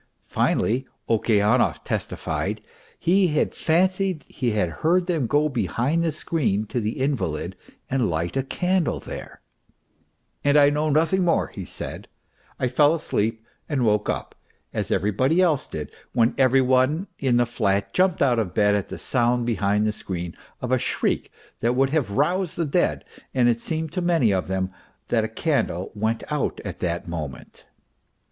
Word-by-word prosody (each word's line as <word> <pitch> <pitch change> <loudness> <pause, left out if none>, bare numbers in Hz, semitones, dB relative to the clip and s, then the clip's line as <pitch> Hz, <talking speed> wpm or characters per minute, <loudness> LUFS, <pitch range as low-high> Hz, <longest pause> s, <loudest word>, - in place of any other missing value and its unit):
Finally 130 +4 +1 0.2
Okeanov 110 +1 +2
testified - - -3 0.4
he 185 +2 +3
had 150 -2 0
fancied 185 0 +1
he 125 - -2
had 105 -5 +1
heard 175 +3 +3
them 165 -9 0
go 150 +5 +3
behind 140 +3 0
the 165 - +1
screen 140 -9 -1
to 120 - -2
the 110 0 -2
invalid 110 - -1 0.3
and 130 -5 +1
light 85 +4 -2
a 135 - +2
candle 180 +5 0
there, - - -9 0.5
" - - -44
and 145 +1 +4
I 145 0 +6
know 150 +1 0
nothing 165 +5 +2
more," 175 - +2
he - - -7
said, - - -7 0.3
" - - -33
I 130 - +1
fell 145 +5 +4
asleep, 110 -7 -2 0.2
and 135 -5 +1
woke 105 -1 +2
up," - - -3 0.4
as - - -2
everybody 105 - +2
else 165 -7 +2
did, - - -6 0.2
when 115 -1 +3
every 135 0 +4
one 130 +7 +2
in 130 -3 +2
the 120 - +4
flat 100 -4 0
jumped 185 -4 +3
out 125 -4 +3
of 90 -5 -3
bed 105 -1 +4
at 100 -2 -1
the - - -6
sound 120 -1 +1
behind 105 -2 +1
the 110 - +2
screen 90 -4 -5 0.3
of 125 - -3
a 130 - +3
shriek - - -1 0.3
that. 120 +2 +1
would 135 +1 +2
have 150 -8 +1
roused 170 - 0
the 170 - 0
dead, 140 - 0 0.3
and 125 -2 +4
it 120 -1 +2
seemed 160 +1 -3
to 185 - -2
many 165 -11 +3
of 95 - -1
them 95 0 -1 0.4
that 115 -2 +2
a - - 0
candle 110 - -1
went 110 +1 -1
out 150 -1 -1
at - - -6
that 85 -1 -2
moment. 75 -6 -7
125 Hz, 170 wpm, -24 LUFS, 105-155 Hz, 0.5 s, I